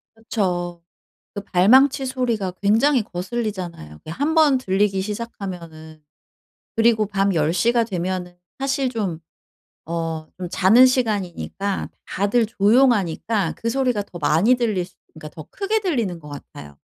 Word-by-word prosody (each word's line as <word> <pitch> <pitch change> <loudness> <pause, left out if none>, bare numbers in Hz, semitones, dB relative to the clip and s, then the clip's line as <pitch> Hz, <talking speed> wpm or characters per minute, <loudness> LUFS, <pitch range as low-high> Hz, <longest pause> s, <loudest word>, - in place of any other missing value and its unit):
그쵸. 180 -6 -3 0.5
그 200 - -5
발망치 260 +9 +4
소리가 235 -7 -1
굉장히 230 +6 +3
거슬리잖아요, 185 - -5
그게 155 - -11
1 290 - -1
번 300 -5 +5
들리기 195 -3 +1
시작하면은. 180 -7 -7 0.7
그리고 225 -2 +3
밤 195 -1 0
10 155 -1 +1
시가 230 +7 +2
되면은 180 -3 -4 0.2
사실 270 0 0
좀 195 -9 -3 0.7
어 165 -1 -3
좀 180 - -5
자는 220 +9 +6
시간이니까 200 -5 -2 0.2
다들 205 +4 +1
조용하니까 210 -4 +2
그 230 - -3
소리가 250 -3 0
더 185 - -11
많이 165 +11 +3
들릴 220 -7 0
수 180 -1 -22 0.2
그러니까 155 -1 -10
더 155 0 -10
크게 415 +2 -1
들리는 235 - -1
것 150 - -13
같아요. 75 - -11
200 Hz, 290 characters per minute, -22 LUFS, 175-240 Hz, 0.7 s, 자는